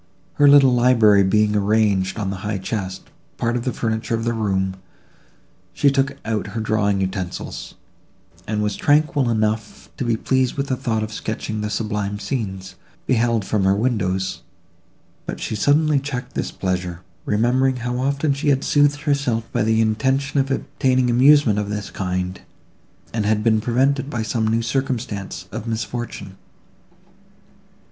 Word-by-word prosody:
Her 145 Hz, -, +8 dB
little 140 Hz, -2 st, +7 dB
library 115 Hz, -5 st, +5 dB
being 105 Hz, +2 st, +2 dB
arranged 100 Hz, -2 st, +1 dB
on 100 Hz, -3 st, -2 dB
a -, -, -6 dB
high 105 Hz, +2 st, -3 dB
chest, 95 Hz, -1 st, -5 dB, 0.3 s
part 120 Hz, 0 st, 0 dB
of 120 Hz, -, -2 dB
the 130 Hz, -, 0 dB
furniture 110 Hz, 0 st, -2 dB
of 115 Hz, -, -3 dB
the 120 Hz, 0 st, 0 dB
room, 95 Hz, -4 st, -1 dB, 1.0 s
she 140 Hz, -, +3 dB
took 135 Hz, 0 st, 0 dB
out 110 Hz, -2 st, -2 dB
her -, -, 0 dB
drawing 105 Hz, -2 st, +1 dB
utensils, 95 Hz, -2 st, -4 dB, 0.7 s
and 105 Hz, 0 st, -1 dB
was 105 Hz, -1 st, -1 dB
tranquil 145 Hz, -3 st, +2 dB
enough 110 Hz, -, -2 dB
to -, -, -2 dB
be 115 Hz, -2 st, +1 dB
pleased 130 Hz, +1 st, 0 dB
with 140 Hz, 0 st, -3 dB
the 130 Hz, -, +1 dB
thought 110 Hz, -3 st, -1 dB
of 110 Hz, 0 st, -5 dB
sketching 110 Hz, 0 st, -4 dB
the 105 Hz, -, -2 dB
sublime 105 Hz, -1 st, -2 dB
scenes, 95 Hz, -6 st, -4 dB, 0.3 s
beheld 115 Hz, -4 st, +1 dB
from 105 Hz, -3 st, 0 dB
her 95 Hz, +1 st, +3 dB
windows; 95 Hz, -5 st, -1 dB, 0.9 s
but -, -, -4 dB
she -, -, -3 dB
suddenly 145 Hz, +5 st, +3 dB
checked 135 Hz, -3 st, -5 dB
this -, -, -2 dB
pleasure, 90 Hz, -2 st, -3 dB, 0.2 s
remembering 125 Hz, +5 st, +2 dB
how 125 Hz, 0 st, -3 dB
often 140 Hz, +2 st, +1 dB
she 140 Hz, +1 st, -1 dB
had 135 Hz, -1 st, +2 dB
soothed 145 Hz, 0 st, +2 dB
herself 140 Hz, -6 st, 0 dB
by -, -, 0 dB
the 110 Hz, +1 st, +2 dB
intention 130 Hz, +6 st, +1 dB
of 135 Hz, 0 st, 0 dB
obtaining 130 Hz, -2 st, +1 dB
amusement 130 Hz, -3 st, +5 dB
of 105 Hz, -1 st, -3 dB
this 105 Hz, -1 st, -4 dB
kind, 90 Hz, -1 st, -3 dB, 0.7 s
and 110 Hz, -2 st, -1 dB
had 105 Hz, 0 st, +1 dB
been 110 Hz, -1 st, +3 dB
prevented 135 Hz, +4 st, +1 dB
by 120 Hz, -5 st, -2 dB
some 110 Hz, 0 st, -1 dB
new 115 Hz, +1 st, +1 dB
circumstance 115 Hz, -5 st, -3 dB
of 115 Hz, -, -6 dB
misfortune. 115 Hz, -4 st, -5 dB
110 Hz, 155 wpm, -21 LUFS, 105-130 Hz, 1.0 s, Her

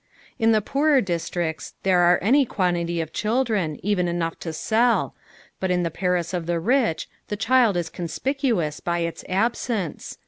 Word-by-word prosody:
In 225 Hz, -1 st, +4 dB
the 215 Hz, -2 st, +3 dB
poorer 285 Hz, +4 st, +3 dB
districts, 170 Hz, -4 st, -3 dB
there 185 Hz, -2 st, +3 dB
are 175 Hz, 0 st, +5 dB
any 270 Hz, +8 st, +5 dB
quantity 175 Hz, -6 st, -1 dB
of 160 Hz, -1 st, -6 dB
children, 215 Hz, -, 0 dB
even 195 Hz, -4 st, +1 dB
enough 170 Hz, -1 st, -2 dB
to 165 Hz, -, -5 dB
sell, 225 Hz, +9 st, +1 dB, 0.5 s
but 190 Hz, -, -1 dB
in 180 Hz, -1 st, +1 dB
the 170 Hz, -, -1 dB
Paris 180 Hz, 0 st, -1 dB
of 175 Hz, -2 st, -3 dB
the 170 Hz, -1 st, 0 dB
rich, 225 Hz, -1 st, +1 dB, 0.2 s
the 210 Hz, -, -3 dB
child 230 Hz, -3 st, +3 dB
is 170 Hz, -2 st, -3 dB
conspicuous 180 Hz, -, -1 dB
by 175 Hz, 0 st, -1 dB
its 170 Hz, 0 st, -4 dB
absence. 210 Hz, -, -2 dB
180 Hz, 165 wpm, -23 LUFS, 170-225 Hz, 0.5 s, are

